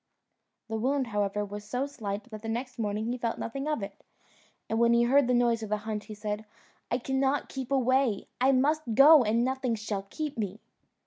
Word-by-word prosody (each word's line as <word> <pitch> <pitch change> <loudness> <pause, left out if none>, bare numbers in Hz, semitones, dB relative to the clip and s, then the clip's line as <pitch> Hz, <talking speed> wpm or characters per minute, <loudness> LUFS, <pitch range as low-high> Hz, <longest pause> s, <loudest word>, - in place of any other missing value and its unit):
The 220 -1 -3
wound, 265 +3 +1
however, 205 -2 -1
was 205 +1 -7
so 250 +6 -2
slight 215 -7 -5
that 215 -1 -7
the 225 - -5
next 245 +2 -4
morning 210 0 -1
he 245 +2 -2
felt 230 -1 -2
nothing 275 +5 -4
of 300 -9 -1
it, 200 0 -8 0.6
and 225 - -1
when 235 0 +5
he 235 0 +4
heard 270 +2 +4
the 250 - +2
noise 235 -1 +2
of 220 - -5
the 210 - +1
hunt, 210 0 -5
he 215 - -8
said, 210 0 -4 0.5
"I 240 - +1
cannot 265 +2 0
keep 265 -1 -6
away; 260 -4 +2 0.2
I 265 - +6
must 275 -2 +1
go, 295 +2 +8
and 230 +2 +2
nothing 260 -2 -1
shall 210 -2 -4
keep 300 -5 -4
me." 205 0 -3
235 Hz, 205 wpm, -29 LUFS, 215-265 Hz, 0.6 s, go